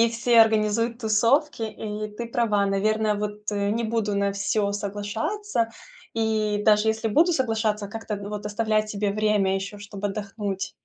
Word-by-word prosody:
и 230 0 +5
все 235 0 +4
организуют 225 +1 +2
тусовки, 235 +5 +2
и 215 -1 -4
ты 235 - -4
права, 225 -4 +1
наверное, 215 +2 +1
вот 210 0 -4
не 205 +3 0
буду 215 -2 -1
на 200 0 +1
всё 200 +1 0
соглашаться 225 - -2 0.4
и, 220 -2 0
даже 210 0 +4
если 220 +1 0
буду 325 - +4
соглашаться, 220 -6 0
как-то 220 0 -5
вот 205 +1 -6
оставлять 215 0 0
себе 205 -1 -1
время 210 -2 +2
еще, 195 +2 -4
чтоб 205 0 -9
отдохнуть. 200 -1 -3
215 Hz, 150 wpm, -25 LUFS, 205-225 Hz, 0.4 s, и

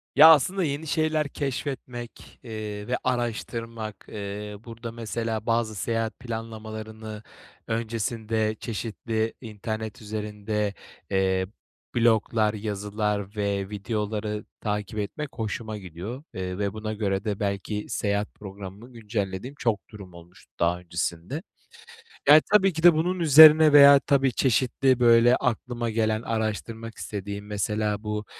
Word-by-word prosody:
Ya, 155 +3 +10
aslında 180 +5 +5
yeni 150 +1 -2
şeyler 155 +1 +1
keşfetmek, 130 -4 -5
eee, 105 -3 -6
ve 125 - 0
araştırmak, 115 -3 -3
eee, 105 0 -6
burada, 115 0 -7
mesela 115 -1 -3
bazı 115 -1 0
seyahat 115 +2 -2
planlamalarını 110 -2 -7 0.4
öncesinde 110 -1 -1
çeşitli 110 0 -3
internet 110 -1 -5
üzerinde, 105 -1 -3 0.4
eee, 95 -1 +2 0.5
bloglar, 110 -2 +3
yazılar 105 -1 -3
ve 100 -2 -1
videoları 105 0 -3 0.2
takip 105 0 -3
etmek 135 +9 -4
hoşuma 110 -1 -4
gidiyor. 100 - -7
Eee, 90 0 -4
ve 100 -1 -1
buna 110 0 -4
göre 100 -2 -1
de 105 -3 -2
belki 100 +1 -2
seyahat 100 0 -1
programımı 100 +4 -10
güncellediğim 105 +2 -4
çok 110 -5 -1
durum 100 -5 -11
olmuştu 85 +1 -16
daha 85 +1 +2
öncesinde. 85 - -3 0.9
Yani, 150 +2 +9
tabii 195 -3 +5
ki 160 +1 -5
de 175 -1 +9
bunun 175 +4 0
üzerine 155 -1 +9
veya 140 -1 +9
tabii 135 -2 +2
çeşitli, 130 +1 +2
böyle, 120 0 +6
aklıma 120 -1 -2
gelen, 110 -1 0
araştırmak 115 0 -3
istediğim, 100 0 -5
mesela 105 0 -1
bu, 105 0 -3
110 Hz, 120 wpm, -26 LUFS, 105-120 Hz, 0.9 s, Ya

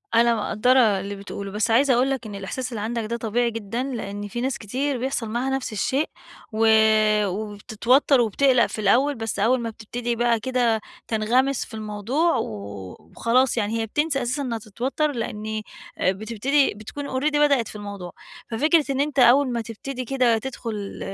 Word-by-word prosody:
أنا 235 0 +5
مقدرة 230 +4 +2 0.2
اللي 200 +1 -5
بتقوله، 200 0 -7
بس 215 +3 0
عايزة 260 +3 +4
أقول 255 +3 +2
لك 265 -4 -2
إن 205 - -7
الإحساس 245 +6 -5
اللي 220 -3 -4
عندك 230 +1 -2
ده 230 +2 -3
طبيعي 235 +1 0
جدًا، 230 +2 -3
لأن 205 -6 -5
في 240 +4 -4
ناس 260 0 -1
كتير 260 +6 -2
بيحصل 245 -2 -2
معاها 240 +4 -1
نفس 265 -4 -2
الشيء، 265 +8 0 0.4
و 225 +1 +2 0.6
وبتتوتر 220 +7 +1
وبتقلق 245 +2 +3
في - - -6
الأول، 260 +8 +3
بس 225 -3 -4
أول 245 +5 +3
ما 230 -1 -3
بتبتدي 235 +2 -4
بقى 235 -1 +2
كده 235 -2 +1 0.3
تنغمس 245 +5 +1
في - - -16
الموضوع 220 - 0
وخلاص، 105 - -2
يعني 225 +1 0
هي - - -1
بتنسى 290 +4 0
أساسًا 250 +4 -2
إنها 245 -4 -2
تتوتر، 245 +8 -2
لأن 220 -3 -4 0.4
آآ 185 - +2
بتبتدي 230 +8 +1
بتكون 220 +8 -7
Already 275 +4 0
بدأت 280 -6 +3
في - - -10
الموضوع. 200 -3 -7 0.4
ففكرة 305 +7 +3
إن 270 - -1
أنتَ 285 -1 -1
أول 255 +2 +6
ما 235 -1 -1
تبتدي 250 +4 -6
كده 245 -3 +2
تدخل 220 -5 -5
235 Hz, 170 wpm, -24 LUFS, 215-260 Hz, 0.6 s, أول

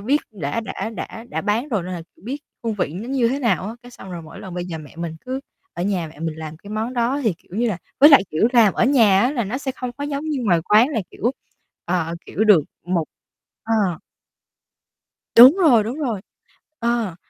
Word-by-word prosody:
biết 275 +8 +1
đã 170 +2 -3
đã 220 0 -5
đã 225 +1 -7
đã - - -3
bán 225 +7 -1
rồi 210 -8 -1
nên 185 +1 -6
là 170 - -6 0.2
biết 260 +7 -4 0.3
hương 225 -2 -1
vị 160 -6 -2
nó 220 +7 -6
như 255 -4 +2
thế 270 +3 -1
nào 235 -7 +1
á. 225 - -5
Cái 245 - -13
xong 190 -6 -11
rồi 170 - -6
mỗi 160 - -11
lần 185 -2 -8
bây 175 0 -3
giờ 165 -3 -5
mẹ 150 0 -13
mình 165 -1 -5
cứ 260 +1 -3 0.3
ở 175 - -4
nhà 185 -4 -1
mẹ 155 - -16
mình 160 -1 -3
làm 155 0 -7
cái 205 +5 -13
món 220 +3 -2
đó 245 +4 0
thì, 205 -6 +2
kiểu - - -27
như 240 0 +2
là 185 -5 -2 0.2
với 295 +3 +9
lại, 280 - +8
kiểu, 185 +9 +2
làm 225 -5 +5
ở - - +2
nhà 225 -8 +5
á, 250 +5 +2
là 240 -6 -1
nó 235 +7 -3
sẽ 270 -2 -3
không 250 -1 -5
có 285 +3 -6
giống 290 +1 -3
như 300 -3 -2
ngoài 175 -5 +3
quán 220 +7 +5
là 255 -7 -1
kiểu, 240 - -1 0.5
ờ, 170 -2 -1
kiểu, 220 - -1
được 205 -7 +7 0.2
một 175 -3 0 0.6
ờ. 210 -7 +1 1.4
Đúng 255 +9 +10
rồi, 255 - +5
đúng 240 +6 -4
rồi, 235 -10 -2 0.6
ờ. 235 -7 -1
220 Hz, 230 wpm, -21 LUFS, 180-250 Hz, 1.4 s, Đúng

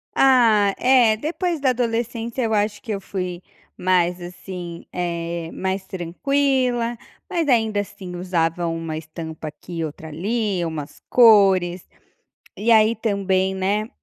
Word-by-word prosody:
Ah, 225 -7 +5
eh, 245 -4 +5
depois 335 - -2
da 270 - +3
adolescência 235 0 -2
eu 220 -1 0
acho 210 0 0
que 225 - -6
eu 200 - -2
fui 180 -2 -5 0.4
mais, 180 -1 +2
assim, 175 -1 -8
eh, 170 -1 -3
mais 190 0 -3
tranquila. 240 +6 0 0.3
Mas 335 -3 -1
ainda 220 -5 +2
assim 185 -3 -6
usava 175 -1 -1
uma 165 -1 -3
estampa 160 0 -7
aqui 170 +3 -10
e 160 - 0
outra 155 +1 -8
ali, 195 +2 -1
umas 155 -3 -6
cores, 195 -6 +5 0.7
e 225 +3 0
aí 220 0 +5
também, 195 -3 0
né, 205 +3 0
195 Hz, 135 wpm, -22 LUFS, 175-230 Hz, 0.7 s, Ah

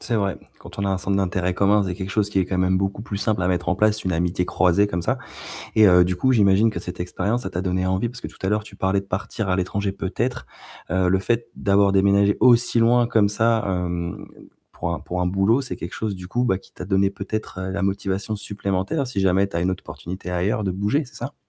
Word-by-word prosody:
C'est 120 - -1
vrai. 100 -3 -1 0.2
Quand - - -13
on 100 - -1
a - - 0
un 95 -1 0
centre 95 +1 -1
d'intérêt 90 -1 0
commun, 100 +3 +3
vous 100 - 0
avez 90 - -2
quelque 95 +1 -5
chose 105 -1 +1
qui 100 - -1
est - - +2
quand 90 +1 -3
même 95 0 +2
beaucoup 95 +2 -1
plus 105 -2 -5
simple 105 -2 0
à 90 - +1
mettre 90 -1 -1
en 95 - +1
place, 105 +1 +2
une 95 - 0
amitié 90 +1 0
croisée 90 +3 +3
comme 90 -4 -3
ça. - - 0 0.6
Et 110 -1 +7
heu, 90 -2 +6
du 90 +1 -1
coup, 130 +8 +2
j'imagine 105 -1 +4
que - - -5
cette 90 - -7
expérience, 105 +6 -1
ça 95 - -5
t'a 90 +2 -3
donné 95 0 0
envie. 95 +5 0
Parce 125 +1 -9
que - - -6
tout - - -13
à 95 - 0
l'heure, 105 +1 0
tu 100 - -13
parlais 95 +1 +1
de 100 - -14
partir 100 +2 -3
à 90 - +2
l'étranger 95 +2 -1
peut-être. 110 +6 -3 0.4
Heu, 95 -1 +2
le 95 +1 +3
fait, 115 +3 -1
d'avoir 100 0 +3
déménagé 100 +1 +4
aussi 120 -1 +4
loin 120 +1 +4
comme 110 -3 +3
ça, 110 +2 +1
hem, 90 -2 -3 0.5
pour 85 - -3
un - - -4
pour 90 0 -4
un 90 - +1
boulot, 95 +7 +2
c'est 135 - -5
quelque 85 - -7
chose 110 -2 -3
du 90 -1 -9
coup 120 +5 0
bah, 95 -6 +1
qui - - -21
t'a - - -8
donné 95 +1 +2
peut-être 105 0 -5
heu, 95 0 -3
la 100 +1 -3
motivation 100 +2 -1
supplémentaire, 100 +7 -2
si 125 -5 -3
jamais 95 +1 +3
tu 85 - -5
as - - 0
une 90 +2 +1
autre 95 - -4
opportunité 90 +1 -7
ailleurs, 95 +4 0
de 95 - 0
bouger, 105 - 0
c'est 130 - -17
ça? 135 +5 -6
100 Hz, 265 wpm, -23 LUFS, 95-105 Hz, 0.6 s, Et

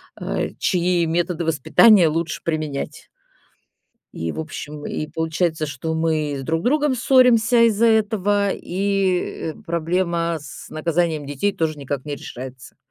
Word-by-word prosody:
а, - - -3
чьи 175 -2 +1
методы 170 +1 -1
воспитания 170 - +5
лучше 160 +1 -2
применять. 155 -4 -4 1.1
И, 80 0 -3
в - - -7
общем, 150 -1 -7
и 155 - -3
получается, 160 0 -1
что 145 +3 -4
мы 155 -3 0
друг 160 +4 -1
с - - -11
другом 295 0 +2
ссоримся 245 -2 +4
из-за 225 +1 +3
этого, 205 -2 +2
и 190 -4 -1
проблема 170 0 -1
с 145 - -10
наказанием 160 -1 -1
детей 145 +8 -1
тоже 155 -2 -1
никак 140 -1 -4
не 145 -1 -4
решается. 130 -1 -10
165 Hz, 130 wpm, -21 LUFS, 155-195 Hz, 1.1 s, воспитания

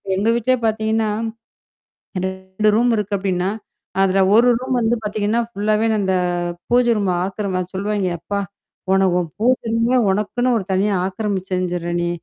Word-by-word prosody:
எங்க 205 +4 +1
வீட்லே 255 +2 +2
பார்த்தீங்கன்னா, 220 0 +1 1.2
2 190 +3 -2
ரூம் 240 +1 +3
இருக்கு 205 -1 -2
அப்பிடின்னா, 185 -1 -1 0.5
அதில 195 0 +3 0.2
ஒரு 245 +2 +6
ரூம் 255 0 -1
வந்து 230 +1 +2
பார்த்தீங்கன்னா 210 +2 0
ஃபுல்லாவே 215 0 0
அந்த 190 -1 +1 0.6
பூஜ 245 0 +4
ரூம் 195 -3 0
ஆக்கிரம 190 -2 -2
சொல்லுவாங்க 200 -1 -1
அப்பா! 200 +3 -3 0.5
உன 195 0 +4
உன் 170 -2 -2
பூஜை 245 +1 +1
ரூமே 235 +3 +2
உனக்குன்னு 235 +5 0
ஒரு 195 - -5
தனியா 200 +2 +2
ஆக்கிரமிச்சுஞ்சிற 185 -3 -2
நீ! 175 - 0
205 Hz, 135 wpm, -20 LUFS, 190-225 Hz, 1.2 s, ஒரு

